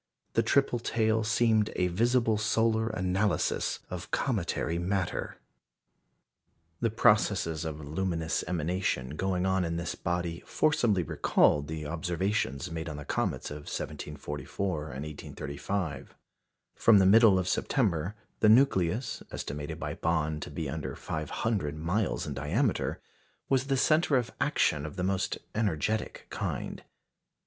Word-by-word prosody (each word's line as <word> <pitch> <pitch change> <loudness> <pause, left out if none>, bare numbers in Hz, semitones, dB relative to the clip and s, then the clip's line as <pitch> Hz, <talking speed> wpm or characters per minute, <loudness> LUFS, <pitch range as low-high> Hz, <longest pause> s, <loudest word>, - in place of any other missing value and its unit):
The 115 - +4
triple 120 +1 +2
tail 110 -1 +1
seemed 110 -1 +3
a 90 - +2
visible 115 +4 +2
solar 110 +1 +2
analysis 95 -1 0
of - - -6
cometary 85 +2 -1
matter. 95 0 -2 1.4
The 115 - +1
processes 105 -7 +2
of 80 -1 -4
luminous 80 +1 -1
emanation 80 -5 -1
going 95 +1 0
on 95 -1 +2
in 85 -1 -2
this 85 0 -3
body 85 -1 -2
forcibly 120 - +2
recalled 75 -1 +2
the 80 -1 -5
observations 85 0 -1
made 80 0 -4
on 75 - -6
the 75 - -7
comets - - -2
of 75 0 -7
1744 75 +4 -4
and 70 -1 -6
1835. 75 +1 -5 0.6
From 115 -2 +5
the 95 - +5
middle 105 0 +7
of 95 -1 0
September, 95 - 0 0.2
the 105 - +5
nucleus, 110 -2 +3
estimated 75 +1 -5
by - - -3
Bond 80 -2 0
to - - -5
be 75 +1 -4
under 75 +2 -4
five 75 -1 -4
hundred 95 -10 -1
miles 90 +7 -1
in - - -4
diameter, 95 - 0 0.5
was 135 0 +2
the 135 -1 +1
centre 155 0 +3
of 120 -3 -1
action 75 -2 +2
of 80 - -6
the 90 - -2
most 95 0 0 0.2
energetic 105 0 -1
kind. - - -3
90 Hz, 135 wpm, -29 LUFS, 80-110 Hz, 1.4 s, middle